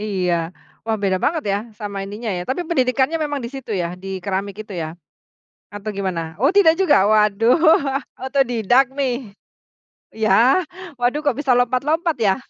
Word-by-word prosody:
Iya. 190 -4 -1 0.5
Wah, 225 -1 0
beda 190 -2 +1
banget 320 0 0
ya 200 - +1 0.2
sama 205 -1 -6
ininya 210 +2 -5
ya, 180 -2 -2
tapi 310 +7 -2
pendidikannya 265 0 +1
memang 290 -2 -2
di 235 - -4
situ 265 -5 -6
ya, 180 -1 -3
di 195 - -7
keramik 195 +1 -3
itu 215 - -24
ya? 160 +1 -6 0.8
Atau 205 +1 -7
gimana? 190 -4 -2 0.2
Oh, 275 - +5
tidak 325 -6 +6
juga? 295 - +4
Waduh, 215 +2 +4 0.6
otodidak 255 -2 +2
nih? 265 -3 +1 1.0
Ya. 225 - +3 0.3
Waduh, 245 +4 +1
kok 285 -4 0
bisa 280 -3 +1
lompat-lompat 295 +7 +1
ya? 200 -4 +3
230 Hz, 155 wpm, -20 LUFS, 200-275 Hz, 1.0 s, tidak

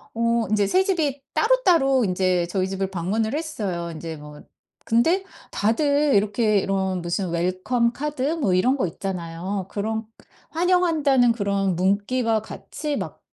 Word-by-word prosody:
어 230 0 +1
인제 205 -2 +2
3 375 - +3
집이 300 -8 0
따로따로 340 - +3
인제 180 -1 +1
저희 185 0 0
집을 195 0 -2
방문을 210 - -1
했어요. 200 - -3
인제 160 0 -6
뭐 150 0 -12 0.5
근데 325 +12 +3 0.3
다들 285 +6 +2
이렇게 210 +1 +2
이런 190 -2 -1
무슨 175 +1 -2
웰컴 185 +8 0
카드 295 -1 -4
뭐 245 - 0
이런 255 +10 +2
거 255 - 0
있잖아요. 180 +1 -4
그런 220 +2 -3 0.5
환영한다는 320 -8 +3
그런 200 -4 0
문구와 210 +5 +1
같이 295 +6 -5
막 - - -6
215 Hz, 280 characters per minute, -23 LUFS, 185-275 Hz, 0.5 s, 3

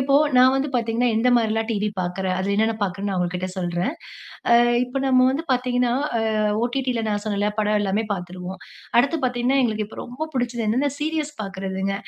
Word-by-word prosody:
இப்போ 275 +1 +2 0.2
நான் 255 +1 +6
வந்து 280 +2 0
பார்த்தீங்கன்னா, 235 +1 +1
எந்த 235 +3 +3
மாரிலாம் 225 0 0
டிவி 210 0 -1
பார்க்கறேன். 185 +1 -2
அதில 200 +2 0
என்னன்ன 220 +1 +2
பார்க்குறேன்னு 195 +1 -3
நான் 185 - -1
உங்ககிட்ட 180 +1 -2
சொல்றேன். 175 - -1 0.6
ஆ - - +6 0.3
இப்ப 250 +2 -9
நம்ம 255 -1 +5
வந்து 295 +5 -2
பார்த்தீங்கன்னா, 250 -1 +1 0.3
ஆ - - 0 0.4
ஒடிடில 245 -2 -1
நான் 205 0 -2
சொன்னேல 205 0 0
படம் 210 0 +2
எல்லாமே 205 +2 0
பார்த்துருவோம். 180 0 -7 0.4
அடுத்து 280 +6 +3
பார்த்தீங்கன்னா, 250 +2 +1
எங்களுக்கு 215 -3 -1
இப்ப - - -12
ரொம்ப 305 +6 -6
புடிச்சது 240 -3 -1
என்னென்ன 265 +6 +1
சீரிஸ் 305 -1 -2
பார்க்கறதுங்க. 195 0 -3
225 Hz, 175 wpm, -23 LUFS, 195-255 Hz, 0.6 s, நான்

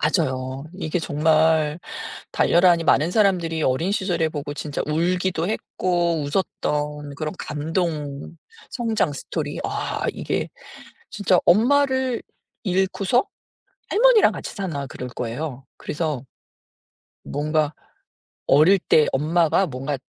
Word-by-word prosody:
맞아요. 130 -4 0
이게 180 -2 -2
정말 155 0 +2 0.5
달려라 175 +1 +4
하니 165 -1 +2
많은 155 +3 +3
사람들이 180 -6 +2
어린 160 +9 +1
시절에 180 -6 0
보고 145 -1 -5
진짜 145 -1 -4
울기도 175 +2 0
했고 175 -6 -1
웃었던 150 -2 -2
그런 155 +3 -4
감동 150 -1 -3 0.3
성장 225 - 0
스토리. 140 - -4
아 - - -3
이게 - - -2 0.6
진짜 190 -3 +2
엄마를 260 +3 +3 0.4
잃고서 190 - +1 0.6
할머니랑 475 0 +5
같이 - - -7
사나 155 -9 -4
그럴 125 -1 -7
거예요. 125 +3 -5
그래서. 150 -4 -3 1.1
뭔가 150 +1 0 0.8
어릴 160 +8 +6
때 155 -2 +4
엄마가 165 +6 +2
뭔가 135 +1 -3
160 Hz, 240 characters per minute, -23 LUFS, 145-185 Hz, 1.1 s, 어릴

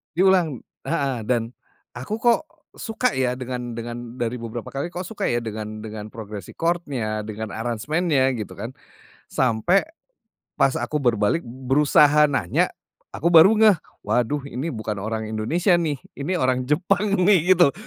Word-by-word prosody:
Diulang 180 -7 +3 0.2
heeh, 140 -6 -1
dan 115 +1 -1 0.4
aku 135 - -4
kok 240 +3 +4 0.3
suka 240 +3 -1
ya 125 -1 +1
dengan 125 -2 -5
dengan 120 +1 -6
dari 120 0 -1
beberapa 115 0 -6
kali 140 +4 -3
kok 180 +1 -4
suka 225 - -3
ya 120 - +1
dengan 110 -1 -5
dengan 110 -1 -7
progres 105 -4 -8
record-nya 140 -11 -2
dengan 110 0 -6
aransemennya 130 +4 0
gitu 105 -4 -5
kan. - - -6 0.5
Sampai 130 - +2 0.8
pas 135 - +4
aku 150 - -2
berbalik 120 +3 +2
berusaha 140 +4 +4
nanya 120 -11 +1 0.4
aku 170 - 0
baru 175 +6 +8
ngeh, 215 -3 +6 0.3
"Waduh 130 +4 0
ini 135 +5 -4
bukan 110 -3 -4
orang 110 +2 -3
Indonesia 150 - +1
nih, 155 -4 -1 0.2
ini 145 +6 -3
orang 130 -4 +1
Jepang 195 +6 +1
nih 185 -2 +5
gitu, 175 -5 +5
130 Hz, 145 wpm, -23 LUFS, 115-165 Hz, 0.8 s, baru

